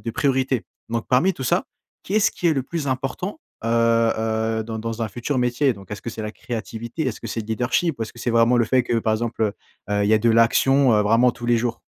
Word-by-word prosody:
de 115 - -4
priorités. 130 -1 0 0.2
Donc, 115 0 -3
parmi 150 +10 +3
tout 130 - -6
ça, - - +1 0.4
qu'est-ce 205 +2 +2
qui 175 - 0
est - - +4
le 135 - 0
plus 155 -1 -4
important, 135 - -3 0.2
heu, 115 - 0
heu, 115 -1 +1
dans 110 0 -5
dans 115 0 -4
un 115 - 0
futur 120 +6 -3
métier? 125 +3 +2
Donc, 100 -4 -14
est-ce 105 - -7
que 115 - -4
c'est 110 0 -6
la 105 0 -5
créativité? 115 +4 -5
Est-ce 120 - -3
que 115 - -6
c'est 115 - -4
le 105 - -8
leadership? 125 +7 0
Ou - - -2
est-ce 110 - -6
que 120 - -15
c'est 120 - -1
vraiment 115 +1 +4
le 120 - +3
fait 130 +3 +2
que 120 -1 0
par 110 -1 0
exemple, 115 0 -2
heu, 105 - 0 0.4
heu, 105 0 +1
il - - +1
y 110 - +5
a 110 - +4
de 115 +1 +2
l'action, 130 +3 +4
heu, 105 - +3
vraiment 115 +4 +4
tous 120 0 -8
les 120 0 +4
jours? 115 0 -2
115 Hz, 260 wpm, -22 LUFS, 110-130 Hz, 0.4 s, y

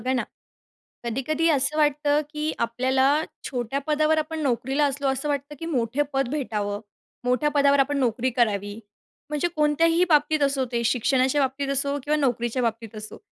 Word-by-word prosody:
बघा 255 +3 0
ना, 250 - 0 0.8
कधी-कधी 270 +7 0
असं 290 0 +1
वाटतं, 295 0 +2
की 300 +1 -2
आपल्याला 260 +5 +2 0.2
छोट्या 250 +1 -2
पदावर 310 +1 +2
आपण 315 +1 -2
नोकरीला 270 +2 +1
असलो, 280 0 -1
असं 270 +2 -2
वाटतं, 285 +1 -3
की 330 - -5
मोठे 260 -4 0
पद 270 -1 +1
भेटावं, 210 -7 -2 0.4
मोठ्या 250 +4 +2
पदावर 280 0 +4
आपण 285 +1 +2
नोकरी 245 0 +1
करावी. 205 -3 0 0.5
म्हणजे 300 +3 0
कोणत्याही 330 +3 +3
बाबतीत 300 0 +3
असो 275 -1 +1
ते 235 -1 -1
शिक्षणाच्या 255 +3 +2
बाबतीत 270 +1 -1
असो 280 +1 0
किंवा 300 +2 +1
नोकरीच्या 245 -3 0
बाबतीत 230 -2 -3
असो 215 0 -8
275 Hz, 160 wpm, -24 LUFS, 245-295 Hz, 0.8 s, पदावर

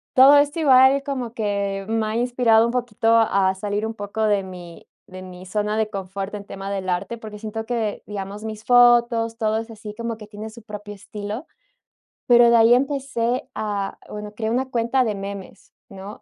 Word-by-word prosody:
todo 270 +3 +8
esto 290 +3 +2
igual 270 -2 +5
como 255 -5 -4
que 200 -3 -2
me 225 0 0
ha 215 - -3
inspirado 235 -2 +3
un 235 - -1
poquito 230 -2 +1
a 195 -4 +3
salir 205 +2 -3
un 225 - -4
poco 210 +1 -4
de 205 -2 +2
mi 180 -2 -11 0.2
de 185 0 -11
mi 185 0 -11
zona 210 +2 -2
de 220 -1 0
confort 195 0 -5
en 205 -1 -6
tema 195 0 -7
del 195 -2 -3
arte, 180 +6 -2
porque 215 -2 -9
siento 220 +1 -6
que, 225 -3 -2
digamos, 205 +1 -6
mis 215 -1 -6
fotos, 240 -2 +4
todo 220 -1 0
es 225 +1 -5
así 215 -1 -9
como 230 0 -4
que 210 -1 -11
tiene 210 +1 -8
su 225 +1 -14
propio 210 -1 -8
estilo, 205 +5 -7 0.8
pero 240 -1 +6
de 235 - +5
ahí 230 +1 +6
empecé 260 -2 -1
a 205 -2 -3
bueno, 210 0 -7
creé 220 0 -3
una 260 +3 -1
cuenta 240 +2 +1
de 215 -3 -1
memes 195 -1 -8 0.2
¿no? 195 +1 -10
220 Hz, 190 wpm, -22 LUFS, 205-235 Hz, 0.8 s, todo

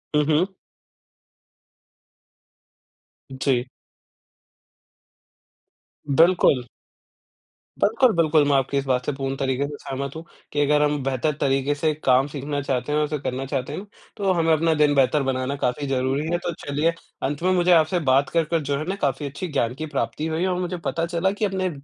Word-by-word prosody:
हुँ, 150 - +4
हुँ। 160 +5 +2 2.8
जी। 130 -2 0 2.5
बिल्कुल। 165 -7 +5 1.2
बिल्कुल, 230 +4 +4
बिल्कुल। 155 -2 +4
मैं 140 - +3
आपकी 135 +1 +1
इस 140 - -1
बात 125 -1 0
से - - 0
पूर्ण 135 0 -3
तरीक़े 135 +1 0
से 145 - -7
सहमत 140 +2 -5
हूँ, 160 - -7 0.3
कि 145 - -2
अगर 150 +1 +3
हम 145 -1 +1
बेहतर 135 +3 0
तरीक़े 135 +1 +1
से 155 +1 0
काम 130 +2 +4
सीखना 145 0 -4
चाहते 135 +1 -2
हैं 150 - +2
और 150 - +2
उसे 150 -1 -3
करना 135 0 -3
चाहते 135 0 -3
हैं 195 +6 -6 0.3
तो 195 -2 +1
हमें 165 -2 +2
अपना 160 +1 +2
दिन 150 -1 +3
बेहतर 135 +2 +3
बनाना 130 +1 -1
काफ़ी 140 +1 -2
ज़रूरी 135 +3 0
है। 175 - +2
तो 175 - -1
चलिए 150 +4 +1 0.3
अंत 145 +4 -2
में 185 - +3
मुझे 180 0 +3
आपसे 165 +2 +4
बात 135 +2 +3
कर-कर 165 0 +1
जो 140 -1 -1
है 155 - -4
ना 195 - -1
काफ़ी 140 +1 0
अच्छी 145 +6 -5
ज्ञान 120 -6 -1
की 155 - -5
प्राप्ति 150 +1 -3
हुई, 160 +3 -1
और 180 -1 0
मुझे 180 0 -3
पता 165 +1 -2
चला 170 +2 0
कि 205 +1 -1
अपने 190 -1 -1
145 Hz, 175 wpm, -23 LUFS, 135-165 Hz, 2.8 s, बिल्कुल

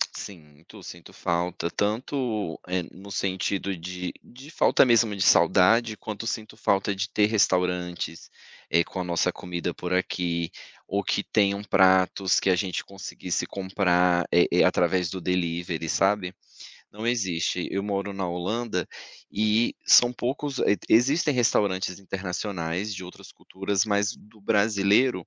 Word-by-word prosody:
Sinto, 80 +2 -11
sinto 85 -1 -11
falta. 85 0 -2
Tanto, 110 - -2
eh, 90 -1 -1
no 100 +2 -13
sentido 95 0 -2
de 90 +1 -6
de 135 +5 -14
falta - - +4
mesmo 115 -4 +3
de 95 - 0
saudade, 110 +4 +4
quanto 110 +3 -6
sinto 110 -1 -4
falta 100 -2 +1
de 100 +1 -3
ter 105 - +2
restaurantes, 90 -5 0 0.4
eh, 85 +1 +3
com 95 - -8
a - - -2
nossa 85 -1 0
comida 90 -1 -4
por 90 - -6
aqui, 85 -2 -1 0.4
ou - - -1
que - - 0
tenham 100 -1 +1
pratos 95 -1 +3
que 95 - +2
a 90 - +4
gente 95 -1 -2
conseguisse 95 -2 -4
comprar, 90 -2 +1
eh 85 - +5
eh, - - +4
através 90 0 +2
do 95 - -5
delivery, 85 -2 -2
sabe. 95 -2 +1 0.6
Não 105 +2 -8
existe, 90 -7 -1
eu 100 - -2
moro 100 0 -3
na 95 -2 -3
Holanda 90 +3 -2 0.5
e 110 +2 +1
são 120 0 +6
poucos, 135 +3 -3
e 105 - +3
existem 140 +6 +3
restaurantes 100 -6 +1
internacionais, 95 0 -4
de 95 - -7
outras 90 - -13
culturas, 95 +2 -2
mas 100 -1 0
do 105 0 -20
brasileiro, 100 0 +2
95 Hz, 145 wpm, -25 LUFS, 90-105 Hz, 0.6 s, são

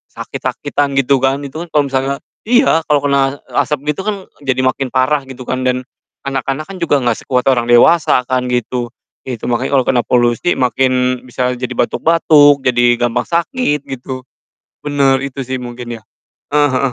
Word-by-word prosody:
sakit-sakitan, 145 -1 -3
gitu 135 0 +3
kan, 135 +2 +1
itu 140 +2 -7
kan - - -18
kalo 145 -2 +2
misalnya 135 +1 0 0.3
iya, 240 - +3
kalo 150 -1 +3
kena, 140 0 +1
e - - -15
asap 150 -1 0
gitu 190 - -5
kan 200 -2 -4 0.2
jadi 130 -2 0
makin 130 0 -1
parah 135 +2 +1
gitu 130 -2 -10
kan, 130 0 -2
dan 125 0 -1 0.4
anak-anak 135 +2 -2
kan 195 - -8
juga 170 -5 +1
nggak 120 -3 +1
sekuat 125 0 0
orang 120 -3 +2
dewasa 145 +5 +5
kan, 125 -1 0
gitu. 120 0 -2 0.3
Ya 125 -3 -5
itu, - - -6
makanya 125 +3 +1
kalo - - +1
kena 120 -2 +2
polusi 120 +6 +1
makin 125 0 +1
bisa 125 0 -2
jadi 125 0 -5
batuk-batuk, 150 -3 +4
jadi 120 -1 +3
gampang 120 0 0
sakit 170 - 0
gitu. 130 0 -7 0.5
Bener, 140 -2 +2
itu 140 0 -5
sih 130 0 -4
mungkin 120 -1 -7
ya. - - -28 0.5
Eh, 145 0 +4
heeh. 130 0 0
130 Hz, 175 wpm, -16 LUFS, 125-145 Hz, 0.5 s, dewasa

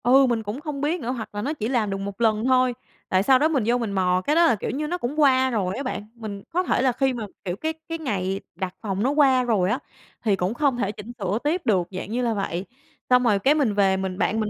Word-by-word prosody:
Ừ, 265 +3 +6
mình 235 -2 0
cũng 215 +7 -5
không 300 -3 -5
biết 315 +4 0
nữa, 240 - -2
hoặc 235 -4 -5
là 205 - -2
nó 285 +8 -2
chỉ 220 -8 -3
làm 235 -5 0
được 195 - -2
một 200 +2 -6
lần 220 0 +2
thôi, 255 -1 +3 0.4
tại 185 0 +3
sau 260 +4 +5
đó 300 - +4
mình 285 -7 +1
vô 240 +1 +3
mình 230 -4 -3
mò, 185 -2 +1
cái 300 - +2
đó 340 +1 +6
là, 280 - +4
kiểu 205 - -4
như, 300 +5 -2
nó 355 +3 -2
cũng 290 0 -3
qua 260 -3 +4
rồi 195 -6 -1
á 275 - -3
bạn. 210 -5 -4
Mình 215 -4 -7
có 355 +2 0
thể 350 - +1
là 260 -1 +3
khi 265 +2 +1
mà, 235 -3 -4 0.2
kiểu, 175 -1 -2
cái 315 +9 -2 0.2
cái 330 - -2
ngày 195 - -2 0.2
đặt 190 -1 -4
phòng 200 -2 -2
nó 260 - +2
qua 275 -3 +4
rồi 210 -7 +1
á, 240 +6 0 0.4
thì 210 -4 +3
cũng 190 +2 -1
không 270 -1 +1
thể 205 -4 -1
chỉnh 215 +2 -9
sửa 195 +1 -1
tiếp 325 +5 0
được, 190 -7 +2
dạng 190 +2 -6
như 245 +2 0
là 235 -2 +1
vậy. 195 -3 -3 0.4
Xong 250 0 +5
rồi 210 -5 +3
cái 275 +9 +3
mình 270 -9 +2
về 195 -2 +3
mình 190 -1 -3
bạn 220 +2 +1
mình 215 -1 -1
235 Hz, 285 wpm, -24 LUFS, 200-270 Hz, 0.4 s, Ừ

